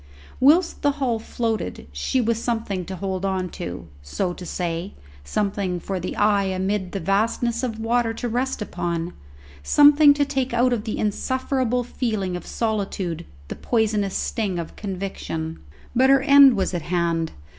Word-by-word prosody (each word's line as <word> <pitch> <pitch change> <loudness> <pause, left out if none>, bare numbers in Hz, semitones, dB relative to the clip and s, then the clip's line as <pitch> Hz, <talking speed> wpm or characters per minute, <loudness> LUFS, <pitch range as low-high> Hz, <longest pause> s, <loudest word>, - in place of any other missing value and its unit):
Whilst 325 +6 +4
the 285 -1 +2
hull 260 -5 -1
floated 220 - -3
she 70 - -1
was 230 0 0
something 225 -7 -2
to 190 - -6
hold 190 0 -3
on 190 -2 -1
to, 85 - -7
so 175 - -2
to 180 0 -9
say, 175 +2 -3 0.3
something 195 - -1
for 190 +2 -4
the 180 - -4
eye 205 -1 +3
amid 190 0 -1
the 195 - -3
vastness 225 +6 0
of 230 -4 -3
water 230 +1 +1
to 240 - -3
rest 245 0 -1
upon, 175 -3 -3 0.5
something 290 - +6
to 290 0 +2
take 265 -3 -2
out 245 +1 +3
of 225 -2 -2
the 220 - -3
insufferable 250 +3 0
feeling 215 -7 -2
of 180 - -7
solitude 195 -6 -2 0.2
the - - -5
poisonous 215 -4 0
sting 200 -5 -2
of 170 -1 -6
conviction. 185 -5 -5 0.4
But 260 +2 +5
her 270 -1 +5
end 280 -3 +8
was 190 -2 -1
at 175 - -1
hand. 170 -1 -1
210 Hz, 160 wpm, -23 LUFS, 180-245 Hz, 0.5 s, end